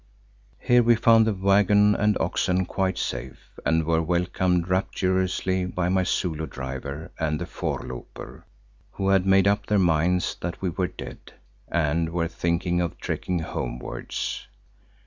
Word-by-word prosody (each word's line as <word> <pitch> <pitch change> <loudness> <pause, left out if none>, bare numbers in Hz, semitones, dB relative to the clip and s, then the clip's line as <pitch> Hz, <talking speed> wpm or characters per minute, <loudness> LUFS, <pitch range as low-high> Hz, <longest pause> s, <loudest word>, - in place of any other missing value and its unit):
Here 125 0 +4
we 120 0 +5
found 115 0 +5
the 110 - +2
waggon 100 +2 +4
and 105 0 +2
oxen 95 0 0
quite 95 0 -1
safe - - -6
and 80 +2 +2
were 80 0 +2
welcomed 90 +1 0
rapturously 95 0 0
by 90 -1 -1
my 95 0 +2
Zulu 80 -3 -1
driver 70 +3 -6
and 75 -2 0
the - - -3
voorlooper, 60 -1 -6 0.5
who 95 0 -1
had 95 -1 +3
made 95 0 +5
up 100 0 +1
their 105 - +2
minds 90 0 +2
that 85 0 -4
we 95 -2 -1
were 95 +1 -1
dead - - -10 0.3
and 80 0 0
were 85 0 -1
thinking 85 +1 -1
of 85 -1 -3
trekking 90 - -3
homewards. 60 -5 -4
90 Hz, 145 wpm, -25 LUFS, 85-95 Hz, 0.5 s, we